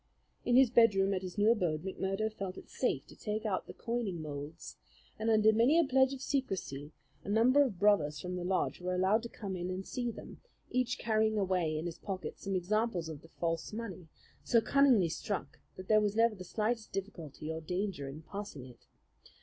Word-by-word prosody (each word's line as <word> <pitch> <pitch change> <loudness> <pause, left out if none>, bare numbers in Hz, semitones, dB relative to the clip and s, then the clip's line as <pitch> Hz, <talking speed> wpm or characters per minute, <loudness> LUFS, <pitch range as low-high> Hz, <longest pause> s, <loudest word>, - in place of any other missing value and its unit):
In 245 - +3
his 260 -2 +6
bedroom 200 -5 +5
at 185 - -1
his 185 0 -7
new 210 +2 +5
abode 175 -9 0
McMurdo 195 +3 -2
felt 190 -3 -5
it - - -12
safe - - -1
to - - -15
take 215 +1 -3
out 195 -3 -1
the - - -8
coining 230 -7 -2
moulds, 150 +1 -7 0.4
and 220 +1 0
under 220 0 +5
many 240 +9 +4
a 340 - +6
pledge 265 -2 +3
of 270 -1 -6
secrecy 180 - -2 0.3
a - - -7
number 240 +7 +5
of 250 -10 +1
brothers 165 -7 +3
from 180 0 -4
the 180 - -3
lodge 185 0 0
were 180 0 -1
allowed 190 +5 +3
to 235 - -7
come 195 -5 -5
in 180 0 -3
and 185 +1 -4
see 245 -2 -2
them, 230 - -9 0.3
each 250 0 0
carrying 220 -1 +1
away 180 -5 +1
in 155 - -3
his 170 -2 -5
pocket 185 -5 -5
some 195 -1 -3
examples 185 -2 0
of 155 -2 -7
the 165 - -15
false 165 0 -3
money, 200 -7 -6 0.4
so 235 - +4
cunningly 255 -7 +4
struck 180 +4 -4 0.2
that 185 0 -9
there 215 -1 +5
was 205 -1 0
never 230 0 +4
the 185 -3 -8
slightest 220 +4 -2
difficulty 165 -6 -5
or 160 0 -4
danger 180 -4 -3
in 150 +4 -9
passing 180 -6 -7
it. 125 -2 -16
195 Hz, 205 wpm, -32 LUFS, 175-225 Hz, 0.4 s, his